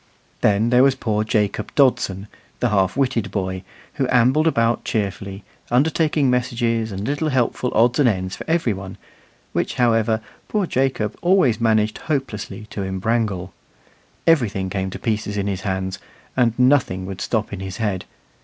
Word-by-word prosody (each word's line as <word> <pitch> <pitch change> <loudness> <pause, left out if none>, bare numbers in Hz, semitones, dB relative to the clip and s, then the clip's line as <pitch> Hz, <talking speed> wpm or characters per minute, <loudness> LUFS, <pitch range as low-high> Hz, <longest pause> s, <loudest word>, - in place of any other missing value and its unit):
Then 105 +3 +3
there 125 0 +6
was 135 0 +5
poor 110 -4 -1
Jacob 105 -1 -1
Dodson, 105 -8 +2 0.3
the 125 - +1
half 95 0 +1
witted 125 -7 0
boy, 95 -1 -3 0.3
who 135 - -1
ambled 130 +6 +4
about 115 -6 +2
cheerfully, 100 -1 -3 0.3
undertaking 150 +2 +2
messages 120 -3 0
and 100 +1 -4
little 145 +2 0
helpful 125 -1 0
odds 120 +5 +3
and 135 -4 +5
ends 95 -3 -2
for - - -7
every 160 -9 +2
one, 95 0 -8 0.6
which, - - -1
however, 115 -2 +2 0.3
poor 210 -3 0
Jacob 130 - 0 0.4
managed 110 -2 +2
always - - -15
hopelessly 110 -8 -3
to 100 - -4
imbrangle. 95 -1 -1 0.7
Everything 105 - +2
came 95 -1 -2
to - - -6
pieces 105 -2 -2
in 100 - -1
his 100 -2 -2
hands, 95 -1 -3 0.4
and 120 -3 +2
nothing 125 -8 +3
would 95 -1 -6
stop 110 -3 -1
in 100 - -5
his 95 0 -6
head. 105 -5 -2
110 Hz, 155 wpm, -21 LUFS, 100-125 Hz, 0.7 s, there